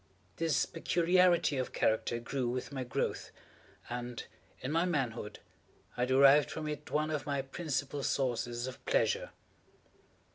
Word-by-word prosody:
This 165 -2 +2
peculiarity 175 -2 +3
of 130 - -3
character 110 +1 +1
grew 125 +1 -2
with 125 +3 -3
my 135 -2 -3
growth, 125 - -2 0.6
and 120 -1 -5 0.4
in 130 - -4
my 165 +2 +2
manhood, 125 -11 -2 0.6
I 125 - +1
derived 140 +3 +6
from 155 -1 -4
it 150 0 -5
one 155 +1 0
of 150 -2 -3
my 140 -1 -1
principal 140 -1 -3
sources 120 -3 -1
of 130 - -8
pleasure. - - +1
140 Hz, 135 wpm, -32 LUFS, 125-160 Hz, 0.6 s, derived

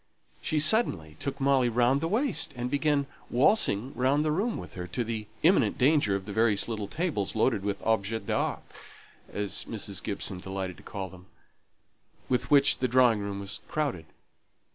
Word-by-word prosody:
She 155 - -1
suddenly 125 - +2
took 140 - -4
Molly 135 -2 +3
round 125 +4 +2
the 165 - 0
waist, 220 - 0
and 125 +1 -3
began 145 -1 +1 0.2
waltzing 130 - +2
round 140 +4 +1
the 155 - +1
room 205 +9 0
with - - -9
her, 90 -1 -6
to 120 +8 -2
the 110 -2 -4 0.2
imminent 150 - +4
danger 135 -7 +3
of 95 -1 -4
the 100 - -6
various 110 -2 +3
little 110 -3 -3
tables, 150 - -2
loaded 110 -1 +2
with 100 -1 -3
"objets 110 -1 0
d'art" - - -1 0.7
(as 100 -1 -2
Mrs. 100 -5 -3
Gibson 100 -2 -2
delighted 95 -1 -5
to - - -14
call 95 -2 -6
them) 90 0 -15 1.0
with 125 0 0
which 140 -1 +5
the 130 - +1
drawing 125 -3 +4
room 100 -1 -4
was 100 +1 -5
crowded. 140 - -2
115 Hz, 170 wpm, -28 LUFS, 100-140 Hz, 1.0 s, which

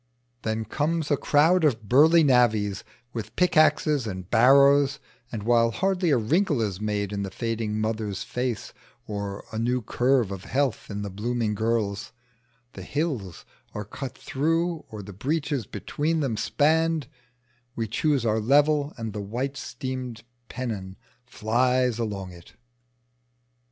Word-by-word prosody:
Then 110 0 -2
comes 155 +6 -1
a - - +5
crowd 160 +6 +3
of 115 -8 +1
burly 160 - +6
navvies 110 -7 +3 0.3
with 115 -3 -6
pickaxes 155 -6 +3
and 95 -3 -6
barrows, 140 +4 +5 0.3
and 110 -3 -5
while 115 0 +4
hardly 185 +5 0
a 140 - +4
wrinkle 150 - +1
is 105 -3 -2
made 105 -1 -2
in 100 - -2
the 100 - -3
fading 110 0 -3
mother's 110 -2 -2
face 125 -3 -3 0.3
or 100 -1 -5
a 110 - -2
new 125 +1 0
curve 125 -1 +1
of 95 -2 -7
health 135 -3 -1
in 100 0 -4
the 100 - -5
blooming 115 +2 -1
girl's, 110 -1 -1 0.6
the - - -9
hills 135 - -3 0.3
are 105 0 -4
cut 130 +5 -7
through 165 +4 -1
or 105 -2 -8
the 100 +1 -10
breaches 140 - -2
between 150 +10 -2
them 135 -7 -1
spanned, 160 +4 +1 0.7
we 115 -1 -2
choose 135 +3 0
our 110 0 +2
level 145 +5 +3
and 115 -3 -5
the 105 - -4
white 125 +7 -3
steam 130 -2 -5 0.3
pennon 105 -7 -5 0.3
flies 125 +1 +1
along 100 -5 -3
it. 85 -1 -15
120 Hz, 140 wpm, -26 LUFS, 105-145 Hz, 0.7 s, burly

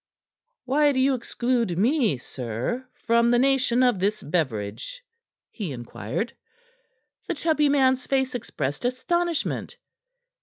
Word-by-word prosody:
"Why 290 +2 +3
do 260 - 0
you 270 +1 +4
exclude 240 -5 -1
me, 230 - +2
sir, 125 - -4 0.2
from 235 +1 +4
the 240 - +4
nation 255 -1 +3
of 245 -6 +3
this 205 +3 0
beverage?" 150 - -2 0.5
he 200 -9 -5
inquired. 120 - -4 0.9
The 355 - -1
chubby 300 -1 +2
man's 260 -2 +3
face 265 -1 +1
expressed 145 - -3
astonishment. 335 +7 -1
245 Hz, 115 wpm, -25 LUFS, 180-270 Hz, 0.9 s, you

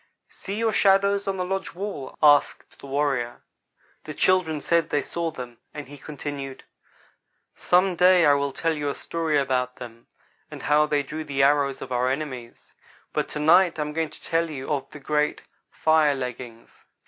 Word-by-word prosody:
"See 195 - -7
your 225 0 0
shadows 200 0 +3
on 195 -1 -1
the 180 - -2
lodge 195 -1 -4
wall?" 185 -8 -6
asked 145 -1 +3
the - - -12
old - - -11
warrior. 135 -5 -1 0.6
The 155 - -7
children 180 -5 +2
said 165 +1 +1
they 145 - 0
saw 170 -1 -3
them, 125 -6 -9 0.2
and 150 -3 -7
he 145 +1 -12
continued: 140 -2 -7 0.9
"Some 180 +1 +2
day 180 0 +5
I 145 - +6
will 140 0 0
tell 165 +3 -1
you 145 -2 -2
a 140 - -3
story 165 -3 -1
about 125 -2 0
them, 115 -1 -11 0.4
and - - -9
how 150 +1 +3
they 145 -1 +1
drew 155 +3 -6
the 140 -2 0
arrows 140 -1 +2
of 130 - -10
our 125 +1 +1
enemies, 130 -4 -6 0.4
but - - -1
to - - -6
night 175 +4 +5
I 150 - 0
am 150 0 -6
going 160 0 -1
to - - -13
tell 165 0 0
you 135 -3 -6
of 140 -2 -2
the - - -11
great 150 +1 -1 0.3
fire 155 -2 +3
leggings. 125 -3 -8
150 Hz, 185 wpm, -24 LUFS, 135-165 Hz, 0.9 s, I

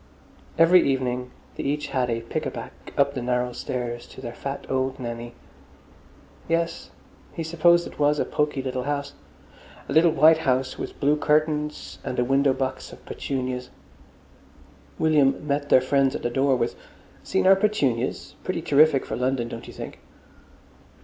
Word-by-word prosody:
Every 170 +2 +7
evening 125 -2 -1 0.3
they - - -4
each 145 +2 -2
had 125 -2 0
a 115 0 -1
pick 115 - -3
a - - -1
back - - -7 0.3
up 140 0 +3
the 130 - -4
narrow 125 0 0
stairs 120 -1 -4
to - - -13
their 120 - -6
fat 140 +2 -6
old 130 0 -1
Nanny. 120 -1 -6 1.1
Yes, 165 0 -1 0.4
he 165 - -4
supposed 170 +1 +3
it - - -11
was 145 0 +3
a - - 0
poky 150 -2 -1
little 130 -1 -3
house. 145 0 -2 0.7
A - - -3
little 165 +3 +6
white 160 +1 +5
house 130 -2 0
with - - -6
blue 145 +2 +3
curtains 150 0 0
and 125 - -4
a 125 - +2
window 135 +1 +3
box 130 0 -3
of - - -14
petunias. 125 -2 -4 1.3
William 150 -3 +2
met 145 0 -1
their 130 - +6
friends 135 0 +2
at - - -5
the 120 - -1
door 135 +1 +2
with 120 -1 -1 0.5
"Seen 190 - 0
our 190 +1 +8
petunias? 145 - 0
Pretty - - -3
terrific 145 -1 +4
for - - -4
London, 125 -1 -1
don't 115 - -8
you - - -10
think?" - - -8
135 Hz, 165 wpm, -25 LUFS, 125-150 Hz, 1.3 s, our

